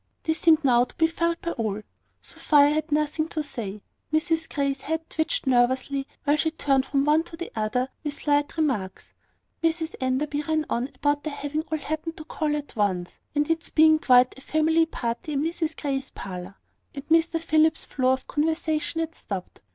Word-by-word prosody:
This 320 0 0
seemed 320 -2 +5
now 245 -2 +5
to - - -19
be 325 - +3
felt 335 +1 0
by 340 - -1
all. 215 -5 -3 0.4
Sophia 290 -2 +3
had 310 +1 -1
nothing 305 +1 +1
to 315 -2 -3
say: 215 -8 -6 0.3
Mrs 320 +1 +1
Grey's 275 -2 -1
head 320 +1 -3
twitched 320 +9 -1
nervously, 260 +2 +2 0.2
while 290 0 +3
she 320 - +2
turned 275 -4 +1
from 275 -1 +1
one 305 +2 +4
to 340 +1 -8
another 220 +4 0 0.2
with 295 -2 -2
slight 290 +1 0
remarks: 250 -12 -2 0.5
Mrs 325 0 0
Enderby 285 +3 0
ran 310 0 0
on 245 +3 0
about 290 0 +1
their 305 -2 -4
having 290 +2 -2
all 315 - +1
happened 315 +2 -4
to 310 - -8
call 305 -2 -1
at 290 -2 -6
once, 190 -5 -1 0.2
and 295 0 +2
its 325 0 -1
being 315 0 +5
quite 250 -3 +5
a - - -14
family 320 +2 +2
party 240 +1 -4
in 280 +1 0
Mrs 325 -1 -2
Grey's 275 -2 -2
parlour; 185 0 -7 0.4
and 275 +1 -7
Mr 330 +1 +3
Philip's 315 -1 +2
flow 255 -1 +1
of 260 0 -4
conversation 315 +1 -1
had 325 0 -3
stopped. 195 - -7
300 Hz, 180 wpm, -25 LUFS, 265-320 Hz, 0.5 s, seemed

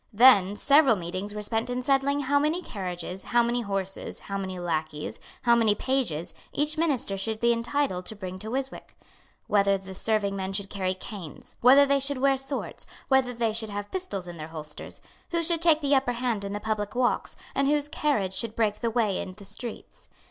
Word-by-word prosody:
Then 205 -4 +6
several 280 0 +5
meetings 185 +3 -5
were 210 - -4
spent 225 +3 0
in 250 0 -2
settling 275 +2 +2
how 285 +1 +2
many 310 +5 0
carriages, 180 - -5
how 240 0 +3
many 240 +1 0
horses, 195 -3 -3
how 200 - -6
many 190 -1 -3
lacqueys, 155 -3 -2 0.2
how 235 - +5
many 225 -3 +4
pages, 220 - -1 0.2
each 300 +1 0
minister 290 -11 0
should 220 +2 -2
be 235 +1 +4
entitled 235 -5 -1
to 220 - -4
bring 185 -2 -6
to 215 +3 -6
Ryswick; 265 +2 -4 0.5
whether 200 -1 +3
the 190 0 -9
serving 205 0 0
men 190 0 -3
should 200 0 -2
carry 185 -2 -1
canes; 185 -4 -9
whether 270 +4 +8
they 280 0 +3
should 275 0 0
wear 275 +1 +3
swords; 270 +1 -5 0.2
whether 265 -2 +4
they 230 -2 0
should 220 0 0
have 205 0 -5
pistols 205 - -4
in 175 -1 -8
their 155 0 -6
holsters; 155 -2 -8 0.3
who 335 -1 0
should 335 0 +1
take 325 -2 +5
the 285 -1 +2
upper 265 -2 +3
hand 235 -4 -1
in 200 0 -4
the 205 - -3
public 210 -1 -2
walks, 245 -1 0 0.2
and 275 0 +2
whose 295 0 +2
carriage 285 - 0
should 225 +2 -3
break 215 -2 +1
the 235 - 0
way 225 -4 +1
in 185 - -6
the 200 +1 -13
streets. 235 +3 -8
220 Hz, 200 wpm, -27 LUFS, 195-270 Hz, 0.5 s, whether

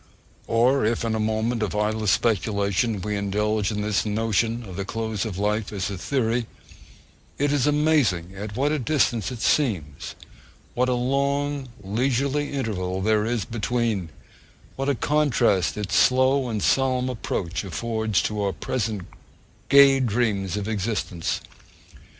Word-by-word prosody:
Or 125 +4 +3
if 115 +2 0
in 115 - 0
a 110 - -1
moment 110 +2 0
of 105 -1 -2
idle 105 +1 0
speculation 100 +1 +1
we 105 +1 -2
indulge 105 +1 0
in 105 -1 -2
this 105 -1 +1
notion 115 +2 0
of 95 - -8
the 100 - -3
close 110 +1 -3
of 100 -5 -4
life 105 +1 -1
as 100 0 -3
a - - -3
theory, 120 -1 0 0.9
it 145 0 +1
is 145 -1 +2
amazing 145 - +2
at 105 +1 -6
what 140 +4 +1
a 155 - 0
distance 120 - +1
it 120 -3 -7
seems; 90 - 0 0.6
what 125 +1 +1
a 125 - +2
long, 140 +2 -1
leisurely 135 +7 0
interval 95 -9 -2
there 110 0 +2
is 115 -2 -1
between; 115 -5 -1 0.7
what 135 +1 -1
a 140 - +2
contrast 140 - +2
its 105 -2 -4
slow 130 0 +3
and 110 -3 -2
solemn 130 -1 +2
approach 95 -8 -3
affords 110 +3 -1
to 105 -1 -2
our 100 -1 0
present 110 -6 -3 0.7
gay 140 -1 +7
dreams 105 -5 0
of 105 0 -3
existence! 100 -5 -2
110 Hz, 145 wpm, -24 LUFS, 100-130 Hz, 0.9 s, gay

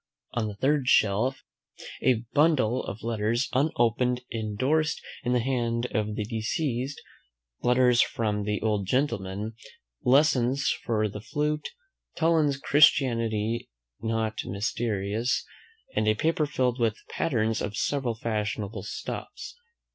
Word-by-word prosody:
On 115 -2 0
the 105 - -6
third 135 +4 +1
shelf 120 +4 +3 0.6
A 120 -3 +2
bundle 145 -6 +3
of 105 - -7
letters 115 +2 0
unopened, 125 -3 +2
indorsed, 130 +8 0 0.2
in 125 0 +1
the 125 - +3
hand 120 -2 0
of 105 -2 -1
the 105 - -1
deceased, 125 +5 -2 0.6
"Letters 125 0 +4
from 105 -2 0
the 105 0 -1
old 105 -3 0
Gentleman." 110 -5 -1 0.5
Lessons 135 0 +3
for 110 -2 +1
the 105 0 -7
flute. 150 +6 -2 0.5
Toland's 160 -4 +2
"Christianity 115 -6 +3 0.3
not 110 -1 -1
mysterious;" 105 +3 -1 0.5
and 110 - +1
a 110 - +4
paper 155 +5 +1
filled 130 -3 0
with 110 -2 +1
patterns 115 -7 0
of 105 0 -3
several 135 -5 0
fashionable 105 -2 -3
stuffs. 105 - -6
115 Hz, 115 wpm, -27 LUFS, 110-130 Hz, 0.6 s, Letters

